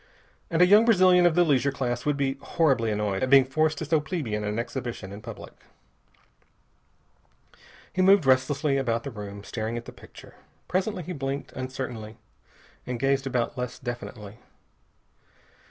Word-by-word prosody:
And 170 +1 +4
a - - +8
young 205 +4 +6
Brazilian 185 -5 +5
of 165 - +1
the 175 - +5
leisure 140 -3 +2
class 125 -1 -3
would 145 -1 +1
be 135 -1 0
horribly 135 -9 +1
annoyed 105 -2 -1
at 130 - 0
being 135 -1 +7
forced 155 +3 0
to 160 - -4
so 160 +1 +2
plebeian 145 - -3
an 105 +1 -2
exhibition 120 -5 -5
in 100 +1 -9
public. - - -9 2.4
He 185 - 0
moved 190 -3 +5
restlessly 135 +2 +2
about 115 -4 -1
the 140 - -6
room, 100 -2 -8
staring 110 +2 -4
at 120 - -7
the - - -9
picture. - - -15 0.3
Presently 185 0 -1
he 180 - -6
blinked 135 -1 -4
uncertainly 125 -4 -6 0.7
and 125 -1 -3
gazed 135 +1 +1
about 125 -1 -2
less 125 +1 -4
definitely. 120 -4 -7
130 Hz, 155 wpm, -26 LUFS, 115-155 Hz, 2.4 s, a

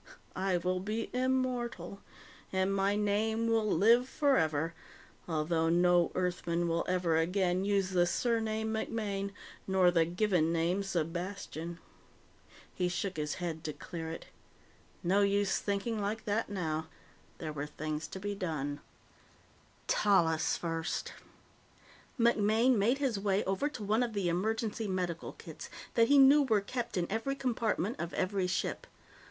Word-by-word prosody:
I 190 -1 +1
will 185 +1 -1
be 215 +4 -3
immortal. 250 -7 -1 0.5
And 190 +1 +1
my 195 +1 +2
name 215 +2 +1
will 225 -1 +2
live 235 +9 +4
forever, 165 - +1 0.5
although 160 0 +1
no 175 0 +4
Earthman 175 -1 0
will 165 0 0
ever 180 -3 +1
again 180 +2 +1
use 200 -2 +1
the 175 -1 +3
surname 220 +1 0
MacMaine 210 -3 -2 0.4
or 185 -2 +5
the 165 -2 +3
given 175 -2 +1
name 170 +3 +1
Sebastian_. 175 -1 -4 1.0
He 180 -1 0
shook 185 +1 -3
his 150 -1 -2
head 165 -3 -4
to 155 - -3
clear 165 +1 -6
it. 165 - -7 0.8
No 195 +4 +3
use 200 0 +2
thinking 205 +2 -2
like 210 +2 -3
that 215 +1 0
now. 160 -5 -2 0.5
There 155 -2 -5
were 145 0 -4
things 155 +1 -4
to 190 - -7
be 205 +1 -3
done. 150 -7 -3 1.1
Tallis 165 -6 +2
first. 165 0 -3 1.1
MacMaine 230 +1 +4
made 225 +5 +2
his 260 -7 0
way 200 0 +1
over 195 +10 0
to 255 -8 -7
one 215 +4 +2
of 240 -2 -1
the 195 -4 0
emergency 220 +4 -1
medical 180 -3 -3
kits - - -10 0.2
that 230 -1 +4
he 285 - +5
knew 275 +2 +8
were 225 -7 +3
kept 235 +2 -4
in 175 - +1
every 225 +6 -1
compartment 235 -5 -1
of 170 0 -4
every 190 0 0
ship. 180 - -2
195 Hz, 140 wpm, -32 LUFS, 170-220 Hz, 1.1 s, knew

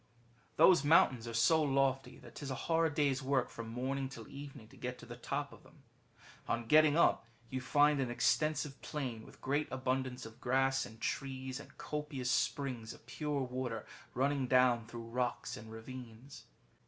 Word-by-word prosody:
*^ - - -35 0.5
Those 165 -1 +6
mountains 130 -6 +4
are 115 - -5
so 160 +8 +4
lofty 135 -2 +1
that - - -14
'tis 140 - -6
a 130 - -2
hard 165 +2 +1
day's 140 -4 +2
work, 130 -1 0
from 115 -1 -7
morning 130 +3 -2
till 115 -5 -9
evening, 140 -4 -9
to - - -16
get 125 0 -5
to - - -12
the - - -8
top - - -3
of - - -15
them. - - -20 0.6
On 115 0 -1
getting 155 +4 +6
up,^ 170 - +5 0.3
you 130 0 -2
find 145 +2 +4
an 130 -2 0
extensive 145 +3 +1
plain, 125 -7 -4
with - - -15
great 145 +3 0
abundance 130 -1 -2
of 115 +2 -12
grass 135 +1 +2
and 110 - -14
trees, 130 +1 -3
and - - -13
copious 150 -4 -3
springs 125 -6 -1
of - - -17
pure 145 +2 -2
water 125 -3 -4 0.3
running 135 +1 +1
down 125 -3 +4
through 115 0 -7
rocks 120 +1 -2
and 110 +1 -10
ravines. 120 +2 -10
130 Hz, 180 wpm, -34 LUFS, 120-145 Hz, 0.6 s, Those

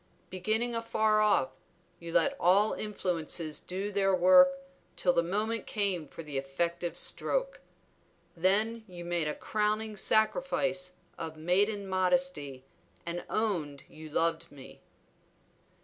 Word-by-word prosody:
Beginning 220 +6 -1
afar 220 -2 +1
off, 205 -11 +3 0.5
you 170 0 -8
let 280 +10 +3
all 200 +4 +4
influences 170 -6 -2
do 195 +3 -4
their 195 -1 +2
work 185 +10 +7 0.5
till 180 - +2
the 170 - +3
moment 215 +6 -2
came 195 -7 -1
for 165 - -10
the 145 -3 -3
effective 170 +5 -3
stroke. - - 0 0.8
Then 210 +6 +1
you 175 -2 -9
made 170 -2 -1
a 150 - -2
crowning 215 0 -1
sacrifice 185 -5 +1 0.3
of 160 -1 -6
maiden 200 +5 +1
modesty 185 - 0 0.4
and 170 +1 -4
owned 170 -11 -2
you 155 0 -11
loved 165 +2 0
me." 140 -2 -13
185 Hz, 120 wpm, -30 LUFS, 170-215 Hz, 0.8 s, work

